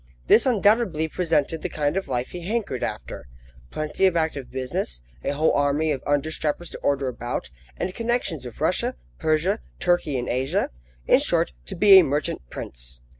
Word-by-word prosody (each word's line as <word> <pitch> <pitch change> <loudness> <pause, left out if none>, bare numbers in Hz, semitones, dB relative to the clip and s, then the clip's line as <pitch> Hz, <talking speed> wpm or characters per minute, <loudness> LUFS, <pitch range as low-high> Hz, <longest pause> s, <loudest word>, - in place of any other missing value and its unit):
This 240 - +5
undoubtedly 205 -8 +3
presented 160 -2 0
the 180 - -3
kind 150 -1 -1
of 195 - -2
life 125 -1 -2
he 180 - -6
hankered 195 - -2
after. - - -5 0.4
Plenty 155 +5 +1
of 175 -2 +1
active 160 -5 -1
business, 125 - -3 0.2
a - - -1
whole 155 +3 +2
army 145 +2 +2
of 135 -3 -2
under 145 +2 +1
strappers 160 +2 -2
to - - -8
order 140 -1 0
about, 120 - -4 0.3
and 185 - -2
connections 230 - -1
with 125 -3 -9
Russia, - - 0 0.2
Persia, 165 +7 +1 0.2
Turkey 175 -6 +1
in 125 - -3
Asia 135 +10 0 0.3
in - - +6
short, 65 - +1
to - - -4
be 200 -2 +9
a - - +6
merchant 145 0 -1
prince! - - -7
155 Hz, 175 wpm, -24 LUFS, 130-180 Hz, 0.4 s, be